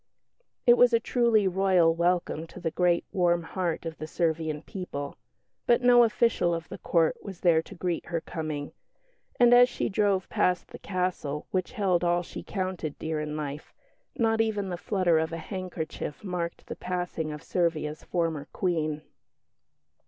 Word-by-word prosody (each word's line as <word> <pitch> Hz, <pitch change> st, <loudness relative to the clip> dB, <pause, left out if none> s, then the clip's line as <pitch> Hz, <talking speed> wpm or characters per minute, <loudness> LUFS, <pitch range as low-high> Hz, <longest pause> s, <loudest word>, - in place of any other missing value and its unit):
It 240 Hz, 0 st, +7 dB
was 245 Hz, -1 st, +6 dB
a 230 Hz, -, +5 dB
truly 230 Hz, -4 st, +2 dB
Royal 185 Hz, -3 st, +3 dB
welcome 170 Hz, -1 st, 0 dB
to 185 Hz, -, -11 dB
the 165 Hz, -3 st, -2 dB
great 175 Hz, 0 st, +2 dB
warm 175 Hz, -2 st, +2 dB
heart 170 Hz, -1 st, -3 dB
of 165 Hz, -1 st, -6 dB
the 155 Hz, -, -5 dB
Servian 160 Hz, -2 st, -1 dB
people; 145 Hz, -7 st, -6 dB, 0.5 s
but 240 Hz, +1 st, +4 dB
no 245 Hz, -1 st, +7 dB
official 220 Hz, -6 st, +2 dB
of 165 Hz, -1 st, -6 dB
the -, -, -8 dB
Court 165 Hz, -2 st, +2 dB
was 190 Hz, -4 st, -9 dB
there 165 Hz, -3 st, +4 dB
to -, -, -12 dB
greet 175 Hz, -1 st, -2 dB
her 170 Hz, -1 st, -1 dB
coming, 155 Hz, -3 st, -5 dB, 0.7 s
and 240 Hz, 0 st, +7 dB
as 245 Hz, +1 st, +7 dB
she -, -, -2 dB
drove 200 Hz, -2 st, +1 dB
past 180 Hz, -1 st, 0 dB
the -, -, -10 dB
castle 180 Hz, -6 st, -2 dB
which 185 Hz, +4 st, -1 dB
held 190 Hz, -7 st, +1 dB
all 175 Hz, 0 st, +2 dB
she -, -, -8 dB
counted 185 Hz, -6 st, -4 dB
dear 160 Hz, -1 st, -3 dB
in 150 Hz, 0 st, -4 dB
life, 145 Hz, 0 st, -6 dB, 0.4 s
not 225 Hz, -3 st, +2 dB
even 210 Hz, -3 st, -1 dB
the 180 Hz, -, -2 dB
flutter 180 Hz, -2 st, +1 dB
of 160 Hz, +1 st, -1 dB
a 165 Hz, -, -3 dB
handkerchief 170 Hz, -4 st, -5 dB
marked 180 Hz, -3 st, -4 dB
the -, -, -6 dB
passing 175 Hz, -3 st, -3 dB
of 150 Hz, -1 st, -8 dB
Servia's 155 Hz, -3 st, -1 dB
former 165 Hz, -4 st, -2 dB
Queen. 155 Hz, -4 st, -1 dB
175 Hz, 165 wpm, -28 LUFS, 160-190 Hz, 0.7 s, It